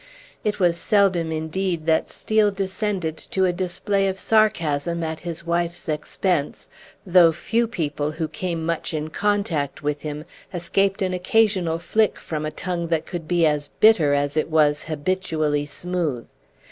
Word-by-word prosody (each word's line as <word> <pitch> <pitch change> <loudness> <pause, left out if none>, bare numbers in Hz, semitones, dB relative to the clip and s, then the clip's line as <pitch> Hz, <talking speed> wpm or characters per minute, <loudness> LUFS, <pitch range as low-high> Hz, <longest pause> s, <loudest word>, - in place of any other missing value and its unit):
It 210 -1 -1
was 175 -2 +3
seldom 185 -5 +2
indeed 160 +1 -2
that 160 -1 +2
Steel 215 -1 +2
descended 195 -3 -2
to 190 -1 +1
a 180 - +1
display 190 +2 0
of 190 0 -2
sarcasm 170 -7 +1
at 160 -1 -3
his 170 -1 -6
wife's 170 0 -1
expense, 155 +1 -2 0.4
though 175 -3 +6
few 230 +8 0
people 150 -8 -2
who 160 0 -2
came 170 -1 -3
much 165 0 -2
in 155 +1 -3
contact 195 -9 -1
with 145 0 -1
him 150 0 -5 0.3
escaped 195 +3 0
an 185 -1 -1
occasional 185 -4 +2
flick 215 +5 +1
from 155 -1 -4
a - - -4
tongue 175 -1 -3
that 165 -1 0
could 170 -3 -6
be 175 -1 +3
as 150 -1 +1
bitter 170 -10 +5
as 145 0 0
it 155 +1 0
was 150 -2 +3
habitually 155 -2 -1
smooth. 155 -4 -2
170 Hz, 155 wpm, -23 LUFS, 155-190 Hz, 0.4 s, though